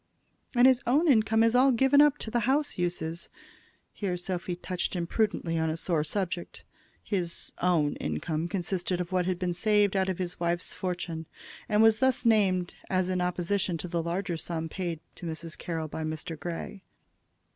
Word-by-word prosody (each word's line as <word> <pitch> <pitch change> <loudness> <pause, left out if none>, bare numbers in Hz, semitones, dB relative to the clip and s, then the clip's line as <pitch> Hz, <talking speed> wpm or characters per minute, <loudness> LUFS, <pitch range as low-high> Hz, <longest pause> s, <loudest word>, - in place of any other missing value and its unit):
"And 245 +1 +6
his 260 -1 +6
own 295 +8 +3
income 225 -4 +4
is 230 0 +3
all 265 +2 +6
given 270 +4 +5
up 295 -1 +5
to 220 - -5
the 240 - +2
house 290 +2 +2
uses." 170 -1 -2 0.6
Here 185 -4 -2
Sophy 180 0 -3
touched 180 +1 -3
imprudently 175 -1 0
on 160 0 +1
a 160 - -2
sore 165 -2 0
subject. 180 +1 -4 0.4
His 180 -5 -2
"own" 170 -5 +2
income 155 - -2
consisted 180 0 -2
of 180 0 -3
what 180 -1 +1
had 185 -1 0
been 180 -1 -1
saved 205 +2 +3
out 190 0 +2
of 185 - -2
his 180 -1 -4
wife's 170 +1 -1
fortune, 175 -3 -4 0.4
and 210 +1 +4
was 225 -1 +5
thus 260 -1 +2
named 190 -6 +3 0.2
as 185 -1 +1
in 185 -1 0
opposition 180 0 0
to 180 - -5
the 170 -1 -1
larger 175 +1 -2
sum 165 0 -4
paid 170 -3 -4 0.2
to 175 - -6
Mrs. 165 0 -5
Carroll 165 -2 -4
by 160 +1 -5
Mr. 155 +1 -4
Grey. 175 +5 -5
180 Hz, 180 wpm, -28 LUFS, 170-210 Hz, 0.6 s, And